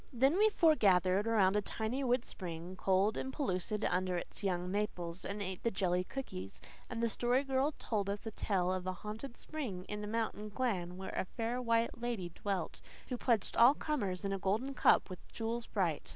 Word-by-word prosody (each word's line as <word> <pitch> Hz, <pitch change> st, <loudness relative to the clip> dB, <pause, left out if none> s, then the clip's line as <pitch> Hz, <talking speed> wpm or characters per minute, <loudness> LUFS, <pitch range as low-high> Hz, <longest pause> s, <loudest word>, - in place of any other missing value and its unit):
Then 270 Hz, +8 st, +3 dB
we 435 Hz, +1 st, +6 dB
foregathered 200 Hz, -, +4 dB
around 205 Hz, -4 st, +4 dB
a 210 Hz, -, +3 dB
tiny 220 Hz, +6 st, -2 dB
wood 250 Hz, -1 st, +2 dB
spring, 175 Hz, 0 st, -6 dB
cold 195 Hz, +3 st, +2 dB
and 265 Hz, -, -3 dB
pellucid 210 Hz, -, -1 dB
under 180 Hz, 0 st, +1 dB
its 175 Hz, -, -6 dB
young 180 Hz, -2 st, 0 dB
maples, 185 Hz, -4 st, -2 dB
and 205 Hz, +1 st, -3 dB
ate 185 Hz, -1 st, -4 dB
the 230 Hz, -, +2 dB
jelly 180 Hz, -3 st, +1 dB
cookies; 95 Hz, -, -6 dB, 0.3 s
and 230 Hz, -1 st, -3 dB
the -, -, +4 dB
Story 245 Hz, +4 st, +1 dB
Girl 270 Hz, +2 st, +1 dB
told 205 Hz, -3 st, -1 dB
us 200 Hz, +2 st, -3 dB
a 225 Hz, -, -3 dB
tale 185 Hz, -3 st, 0 dB
of 185 Hz, 0 st, -3 dB
a 185 Hz, -, 0 dB
haunted 215 Hz, +7 st, -7 dB
spring 240 Hz, -, -5 dB
in 210 Hz, 0 st, -4 dB
a -, -, -4 dB
mountain 215 Hz, -1 st, -2 dB
glen 195 Hz, -6 st, -1 dB
where 190 Hz, 0 st, -6 dB
a -, -, 0 dB
fair 235 Hz, +5 st, -2 dB
white 230 Hz, -1 st, +1 dB
lady 230 Hz, -7 st, -2 dB
dwelt, 190 Hz, 0 st, -3 dB, 0.3 s
who 250 Hz, -, -1 dB
pledged 235 Hz, -4 st, +1 dB
all 245 Hz, +5 st, +7 dB
comers 205 Hz, -, -2 dB
in 195 Hz, -, 0 dB
a 195 Hz, -, -2 dB
golden 220 Hz, +9 st, 0 dB
cup -, -, +5 dB
with 185 Hz, -2 st, -10 dB
jewels 230 Hz, +1 st, -3 dB
bright. 175 Hz, -7 st, -1 dB
210 Hz, 195 wpm, -34 LUFS, 185-240 Hz, 0.3 s, all